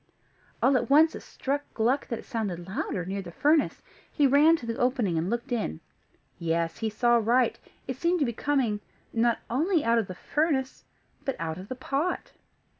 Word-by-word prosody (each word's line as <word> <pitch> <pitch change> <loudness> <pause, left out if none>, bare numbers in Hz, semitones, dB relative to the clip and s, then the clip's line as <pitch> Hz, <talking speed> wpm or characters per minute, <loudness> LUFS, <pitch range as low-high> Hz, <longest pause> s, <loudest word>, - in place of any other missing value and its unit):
All 270 - +5
at - - -2
once 310 +3 +6
it - - -7
struck 280 +2 -3
Gluck 245 +5 +1
that 235 - -3
it - - -11
sounded 190 -7 -3
louder 190 -2 -3
near 195 +2 -3
the 175 -3 -9
furnace. 295 - +2 0.3
He 290 - +2
ran 290 +4 +6
to 285 - -7
the 230 0 -3
opening, 245 -8 +1
and 165 +3 0
looked 235 +4 -3
in: 215 - -1 0.6
yes, 165 0 -1
he 225 - 0
saw 240 +2 +3
right; 235 +3 +2 0.3
it - - -4
seemed 350 +1 +2
to 295 - +2
be 235 - -2
coming, 250 -5 0 0.3
not 235 0 +2
only 315 +5 +1
out 230 0 +4
of 215 - -2
the 185 - -7
furnace, 285 - -1 0.4
but 270 - -2
out 165 0 -4
of 190 - -9
the 255 - -5
pot. 280 +7 -2
240 Hz, 190 wpm, -27 LUFS, 205-280 Hz, 0.6 s, once